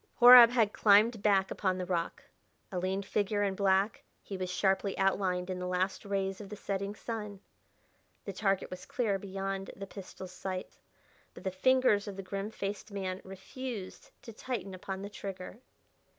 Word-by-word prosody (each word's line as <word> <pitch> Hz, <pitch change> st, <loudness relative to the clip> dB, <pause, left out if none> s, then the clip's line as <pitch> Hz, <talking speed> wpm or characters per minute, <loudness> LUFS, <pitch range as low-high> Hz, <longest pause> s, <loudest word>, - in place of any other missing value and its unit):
Horab 245 Hz, -1 st, +11 dB
had 230 Hz, -4 st, +2 dB
climbed 215 Hz, +2 st, +5 dB
back 195 Hz, -2 st, +3 dB
upon 185 Hz, -2 st, 0 dB
the 180 Hz, -, -3 dB
rock. 170 Hz, -2 st, -2 dB, 0.5 s
A 185 Hz, -, -2 dB
lean 190 Hz, +2 st, -1 dB
figure 205 Hz, +1 st, 0 dB
and 195 Hz, -1 st, 0 dB
black, 195 Hz, +1 st, +2 dB, 0.2 s
he 200 Hz, -, -6 dB
was 185 Hz, -1 st, -3 dB
sharply 190 Hz, +1 st, +1 dB
outlined 185 Hz, -2 st, +1 dB
in 180 Hz, -, -4 dB
the 180 Hz, -, -3 dB
last 185 Hz, +2 st, -1 dB
rays 195 Hz, 0 st, -2 dB
of 200 Hz, -, -9 dB
the 210 Hz, -, -6 dB
setting 200 Hz, 0 st, -3 dB
sun; 210 Hz, -3 st, -6 dB, 0.9 s
the 200 Hz, -, -5 dB
target 195 Hz, 0 st, 0 dB
was 185 Hz, 0 st, -8 dB
clear 205 Hz, -5 st, 0 dB
beyond 195 Hz, 0 st, -4 dB
the 195 Hz, -, -7 dB
pistol's 190 Hz, -1 st, -9 dB
sights. 185 Hz, 0 st, -6 dB, 0.6 s
But -, -, -11 dB
the 190 Hz, -, -1 dB
fingers 215 Hz, +1 st, +3 dB
of 200 Hz, -, -5 dB
the 195 Hz, -, -5 dB
grim 195 Hz, +2 st, -4 dB
faced 205 Hz, 0 st, -5 dB
man 190 Hz, -2 st, -4 dB
refused 195 Hz, +2 st, -7 dB
to 230 Hz, -, -9 dB
tighten 220 Hz, -4 st, -5 dB
upon 190 Hz, +1 st, -6 dB
the 200 Hz, -, -5 dB
trigger. 195 Hz, +1 st, -7 dB
195 Hz, 170 wpm, -31 LUFS, 190-205 Hz, 0.9 s, Horab